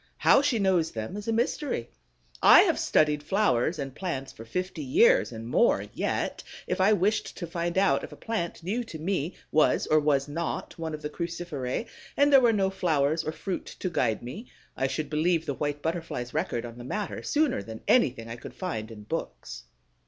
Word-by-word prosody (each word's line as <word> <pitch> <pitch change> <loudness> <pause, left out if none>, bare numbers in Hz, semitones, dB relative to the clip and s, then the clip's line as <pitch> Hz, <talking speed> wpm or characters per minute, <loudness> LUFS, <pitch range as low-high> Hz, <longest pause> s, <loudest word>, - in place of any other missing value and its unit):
How - - +5
she 280 -4 +1
knows 185 -5 +2
them 110 - -5
is 210 +1 -7
a - - +1
mystery. 235 - -1 0.5
I - - +9
have - - +2
studied 150 -1 +2
flowers 170 - +1
and 135 -3 -5
plants 140 -5 -4
for 115 - -10
fifty 180 - -3
years 440 - +4
and 115 0 -7
more, 235 - +3
yet, - - -2 0.2
if - - -1
I 195 +3 +5
wished 210 +2 +1
to 175 - -4
find 170 +1 -3
out 195 0 +3
if - - -7
a - - -9
plant 195 -8 -4
new 220 +8 -1
to 170 - -8
me 170 0 -2 0.2
was 155 - +3
or 155 - +4
was 145 -2 +1
not 165 +3 -4
one 160 -1 -3
of 150 - -12
the 150 - -2
Cruciferæ, 170 - -4 0.3
and 285 0 +4
there 270 - +9
were 240 -2 +5
no 195 -3 +1
flowers 160 -4 +1
or 155 - -2
fruit 185 +3 -5
to 185 - -3
guide 115 -10 0
me, 170 - -7 0.3
I 135 - 0
should 150 +2 -3
believe 160 +2 +1
the 145 - -2
White 145 +1 -3
Butterfly's 160 -7 -3
record 120 0 -1
on 120 0 -9
the - - -7
matter 205 +10 -4
sooner 300 - +1
than 110 +2 -9
anything 120 - +3
I 115 +1 -6
could - - -10
find 115 - -4
in 105 -2 -10
books. 105 - -6
165 Hz, 200 wpm, -27 LUFS, 140-195 Hz, 0.5 s, I